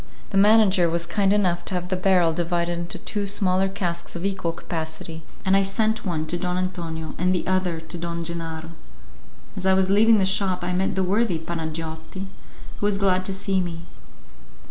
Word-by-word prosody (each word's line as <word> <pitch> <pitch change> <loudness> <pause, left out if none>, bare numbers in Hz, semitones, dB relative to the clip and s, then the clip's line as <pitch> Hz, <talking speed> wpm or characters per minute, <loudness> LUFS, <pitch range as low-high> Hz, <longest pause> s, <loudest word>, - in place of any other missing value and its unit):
The - - -4
manager 200 -4 +5
was 170 +1 -1
kind 195 +3 +1
enough 180 -4 +2
to 190 - -2
have 180 0 -3
the 185 - +1
barrel 180 -3 +3
divided 175 +1 0
into 170 0 -2
two 205 -2 -3
smaller 195 -1 +2
casks 175 -4 -3
of 175 +2 -4
equal 190 -4 -1
capacity, 160 -1 -5 0.2
and 190 0 +4
I 195 - +5
sent 215 +2 0
one 160 -3 -1
to 175 +2 -2
Don 180 0 -1
Antonio, 170 -3 -3
and 180 +1 +2
the 180 - -1
other 185 -3 0
to 165 +2 -9
Don 170 0 -3
Gennaro. 165 -1 -5 0.8
As 190 -1 -2
I 190 - +5
was 190 0 +2
leaving 220 +2 +6
the 195 - +3
shop 190 -2 +1
I 180 +1 -1
met 185 +2 0
the 190 - +1
worthy 200 -1 +1
Panagiotti, 160 +2 -5 0.5
who - - -1
was 205 -1 +1
glad 185 -2 +2
to 195 - -2
see 190 -1 0
me. 170 -2 -4
180 Hz, 190 wpm, -24 LUFS, 170-195 Hz, 0.8 s, leaving